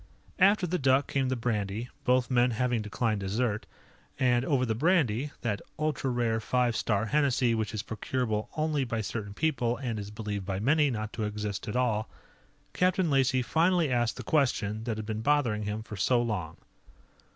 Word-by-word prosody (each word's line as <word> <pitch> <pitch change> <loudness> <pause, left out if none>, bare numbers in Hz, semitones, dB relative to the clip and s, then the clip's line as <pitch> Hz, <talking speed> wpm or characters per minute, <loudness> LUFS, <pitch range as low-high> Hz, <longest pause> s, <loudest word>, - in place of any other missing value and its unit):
After 195 0 +5
the 180 +1 -1
duck 135 0 +3
came 135 -2 0
the 130 - 0
brandy, 110 -1 -2 0.2
both 125 0 +2
men 125 0 +4
having 120 0 0
declined 105 +1 -1
dessert. 105 +2 -1 0.5
And 125 -1 +3
over 130 -2 +1
the 115 - 0
brandy 145 - +2
that 105 -4 -2 0.2
ultra 155 -4 -1
rare 120 -2 0
Five 120 +1 +1
Star 105 -1 0
Hennessy 130 -2 +2
which 110 -2 -1
is 110 -2 -4
procurable 110 -1 -2
only 155 -2 +1
by 115 -3 -2
certain 100 -1 -5
people 125 -6 0
and 115 -4 -3
is 100 0 -6
believed 105 -2 -4
by 95 0 -3
many 145 +6 +3
not 110 -3 -4
to 110 - -3
exist 105 -1 -4
at 105 - -4
all 110 -4 0 0.6
Captain 185 -2 +2
Lacey 130 -2 +3
finally 165 +4 +2
asked 120 -2 +1
the - - -6
question 115 -7 0
that 115 -3 -2
had 110 - -5
been 110 0 -3
bothering 120 -6 +1
him 105 +1 -3
for 110 - -8
so 120 +5 +2
long. 105 -9 -2
120 Hz, 180 wpm, -29 LUFS, 110-135 Hz, 0.6 s, After